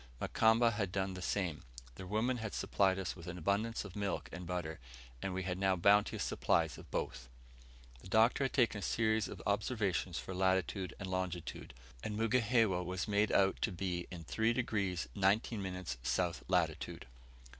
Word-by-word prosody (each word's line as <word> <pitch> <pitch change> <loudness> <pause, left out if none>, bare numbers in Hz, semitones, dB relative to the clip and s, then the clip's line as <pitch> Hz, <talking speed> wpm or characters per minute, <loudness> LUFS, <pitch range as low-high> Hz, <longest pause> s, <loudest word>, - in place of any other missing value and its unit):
Mukamba 115 +1 +4
had 100 -4 -2
done 95 0 -1
the 95 - -7
same. 90 -5 -1 0.3
Their 95 +7 -9
women 110 +6 +1
had 110 -2 -4
supplied 95 -1 +2
us 95 -3 -3
with 85 -1 -11
an 90 0 -5
abundance 100 +6 0
of 95 - -9
milk 100 -2 -2
and 90 +1 -7
butter, 85 -3 -3 0.4
and 95 - -2
we 95 +1 -2
had 90 0 -2
now 95 -1 +3
bounteous 100 +3 +4
supplies - - +1
of - - -13
both. - - -3 0.7
The - - -11
Doctor 110 +7 +4
had 130 - -2
taken 115 -5 +3
a - - -7
series 110 +1 +1
of - - -8
observations 100 -4 0
for 95 - -5
latitude 95 0 0
and 100 - -4
longitude; 95 -6 -4 0.3
and 105 -1 -3
Mugihewa 115 -4 +3
was 90 0 -3
made 105 0 +2
out 95 0 +3
to 110 - +1
be 90 -1 -3
in 90 -3 -7
3 110 +11 +1
degrees 100 -8 -1
19 100 +2 +2
minutes 90 -9 -4
S. 85 +7 0
latitude. 85 -4 0
95 Hz, 175 wpm, -35 LUFS, 90-110 Hz, 0.7 s, Mukamba